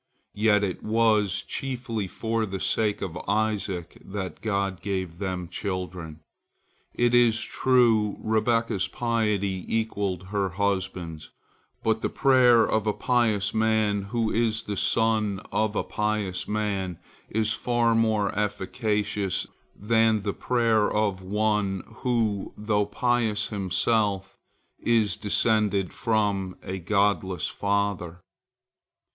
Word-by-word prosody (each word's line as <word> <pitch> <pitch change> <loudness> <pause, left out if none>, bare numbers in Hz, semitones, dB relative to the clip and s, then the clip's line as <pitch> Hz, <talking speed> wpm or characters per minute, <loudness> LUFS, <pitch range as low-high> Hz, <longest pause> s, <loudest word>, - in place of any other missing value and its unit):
Yet 105 -1 +3
it 95 -3 -2
was 110 -3 +2
chiefly 120 -6 -3
for 110 +3 -2
the 95 0 -4
sake 105 +1 0
of 90 -3 -5
Isaac 100 -5 -1
that 95 -2 -6
God 100 -4 -1
gave 95 -4 -3
them 95 -3 -3
children. 90 -4 -5 0.7
It 120 0 +2
is 120 -2 +5
true, 115 -5 +2
Rebekah's 110 -3 +1
piety 105 -6 -1
equalled 100 -5 -2
her 100 -1 0
husband's, 95 -6 -2 0.5
but 110 0 +1
the - - 0
prayer 125 -4 +5
of 110 -1 0
a 105 - +2
pious 110 -5 +1
man 110 -2 +2
who 110 +2 -1
is 115 -1 +1
the 105 - -4
son 110 -1 +2
of 110 -1 0
a - - 0
pious 105 -3 -2
man 100 -4 -2 0.3
is 110 0 +1
far 120 -1 +1
more 110 -3 +2
efficacious 105 -1 -1 0.3
than 110 0 +2
the 100 -1 -1
prayer 115 -4 +2
of 105 -3 0
one 105 -1 0
who, 115 -6 -1
though 105 -1 0
pious 115 -1 0
himself, 100 0 0 0.4
is 110 -5 +2
descended 105 -2 +1
from 100 -4 0
a 95 +1 -4
godless 100 -1 +1
father. 100 -4 -1
105 Hz, 115 wpm, -26 LUFS, 95-110 Hz, 0.7 s, is